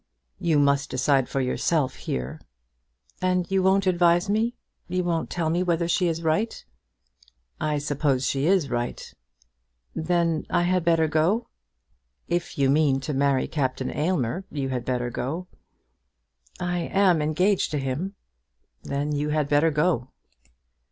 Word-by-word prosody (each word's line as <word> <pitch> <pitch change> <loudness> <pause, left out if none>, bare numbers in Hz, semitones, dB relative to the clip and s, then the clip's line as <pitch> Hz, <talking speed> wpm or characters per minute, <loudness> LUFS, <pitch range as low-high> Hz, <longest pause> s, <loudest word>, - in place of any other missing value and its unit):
"You 165 -3 +2
must 140 -1 +2
decide 130 0 +1
for 135 - -1
yourself 130 +2 0
here." 65 +1 -5 0.8
"And 180 -1 +1
you 195 0 +3
won't 190 +1 +3
advise 175 +1 +3
me. 225 +3 +1 0.3
You 180 0 -1
won't 170 -2 -1
tell 165 -2 -1
me 175 +2 +1
whether 170 -2 +1
she 175 +1 +2
is 165 0 -2
right?" 165 +8 -1 0.9
"I 150 -1 0
suppose 145 -2 0
she 135 +3 0
is 180 -7 +2
right." 120 0 -3 0.8
"Then 165 -1 0
I 175 - +2
had 180 0 +1
better 165 -1 +3
go?" 165 +10 +1 0.8
"If 175 0 -2
you 140 -1 +3
mean 145 -2 +3
to 150 - -3
marry 140 -1 +2
Captain 130 -3 -2
Aylmer, 160 0 -1
you 140 -3 -3
had 125 -2 -3
better 125 -1 -1
go." 150 +10 -3 1.1
"I 175 0 -1
am 180 -1 +2
engaged 180 +6 +1
to 150 - -2
him." 145 +9 -3 0.7
"Then 140 +2 -2
you 150 0 -1
had 150 -1 +1
better 145 +3 +3
go." 150 -4 0
155 Hz, 145 wpm, -25 LUFS, 140-175 Hz, 1.1 s, you